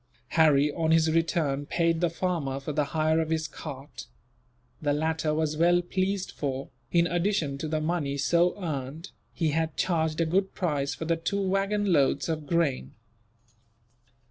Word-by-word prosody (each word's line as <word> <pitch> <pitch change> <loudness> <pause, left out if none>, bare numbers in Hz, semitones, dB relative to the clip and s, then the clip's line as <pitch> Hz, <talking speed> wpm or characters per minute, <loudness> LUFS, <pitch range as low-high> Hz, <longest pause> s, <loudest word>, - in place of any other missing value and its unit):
Harry, 150 -3 +4
on 160 +1 -1
his 160 0 +4
return, 155 -4 0
paid 165 0 +1
the 175 - +3
farmer 165 -6 -2
for 145 +2 -5
the 150 0 +1
hire 155 +1 +1
of 160 -1 -1
his 160 -1 0
cart. 145 -2 -9 0.7
The 145 -2 +1
latter 160 +1 0
was 155 0 0
well 175 +2 +4
pleased 190 +1 -1
for, 135 -2 -4 0.2
in 170 -1 +4
addition 175 -5 0
to 155 - -3
the 155 0 -1
money 155 -4 -1
so 170 +7 +2
earned, 155 0 -5 0.2
he 165 -3 0
had 160 +1 -1
charged 160 -3 0
a 165 - +3
good 190 +4 0
price 145 -6 -1
for 160 - -5
the 165 0 +1
two 185 +5 -2
waggon 195 +1 +1
loads 140 0 +2
of 155 -2 -3
grain. 165 -6 0
160 Hz, 165 wpm, -27 LUFS, 150-175 Hz, 0.7 s, Harry